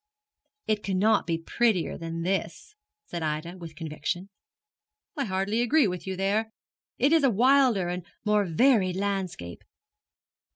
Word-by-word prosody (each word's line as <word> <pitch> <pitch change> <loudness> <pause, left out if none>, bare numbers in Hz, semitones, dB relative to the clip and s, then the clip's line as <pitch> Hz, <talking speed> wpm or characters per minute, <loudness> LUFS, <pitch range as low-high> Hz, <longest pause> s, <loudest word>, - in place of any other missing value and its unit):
'It 215 -1 0
cannot 205 +3 +2
be 165 -1 0
prettier 190 +2 0
than 165 0 -5
this,' 195 - -3 0.3
said 170 - -5
Ida, 155 +3 -3
with 165 -2 -9
conviction. 165 +4 -4 0.9
'I 280 - -1
hardly 195 +3 0
agree 270 +1 +4
with 180 0 -5
you 190 - -2
there. 200 +4 0 0.5
It 275 +5 +3
is 325 -3 +4
a 270 - +5
wilder 245 -3 +4
and 180 0 -3 0.2
more 210 -1 +3
varied 185 - +3
landscape. 190 - -3
195 Hz, 135 wpm, -27 LUFS, 175-225 Hz, 0.9 s, a